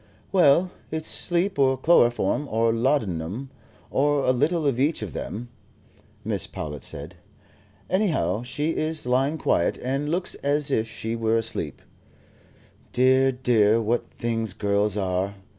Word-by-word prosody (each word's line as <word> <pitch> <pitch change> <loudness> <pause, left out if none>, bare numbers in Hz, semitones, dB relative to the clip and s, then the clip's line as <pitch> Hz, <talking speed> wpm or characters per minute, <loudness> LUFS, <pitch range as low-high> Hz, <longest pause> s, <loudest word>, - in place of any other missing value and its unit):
"Well, 180 0 +4 0.2
it's 160 0 -4
sleep, 180 +1 0
or 130 -1 +3
chloroform, 130 -1 +3
or 115 +1 +2
laudanum, 115 - -1 0.4
or 145 0 +2
a - - +4
little 150 +6 +1
of 135 -4 +1
each 145 -3 +1
of 95 -9 -6
them," 120 +3 -6 0.8
Mrs. - - -2
Powlett 75 -3 -6
said. 75 +5 -5 0.7
"Anyhow, 155 - 0
she 145 +6 -2
is 155 -2 -1
lying 135 +5 +1
quiet, 85 - +1
and 135 +3 -2
looks 175 +3 -1
as 145 0 0
if 110 -3 +1
she 115 +1 -4
were 115 0 +1
asleep. 115 0 -2 1.1
Dear, 130 +1 +4
dear, 115 -4 +3
what 115 +2 0
things 115 -4 -3
girls 100 0 0
are. 95 0 -1
125 Hz, 135 wpm, -25 LUFS, 110-145 Hz, 1.1 s, Well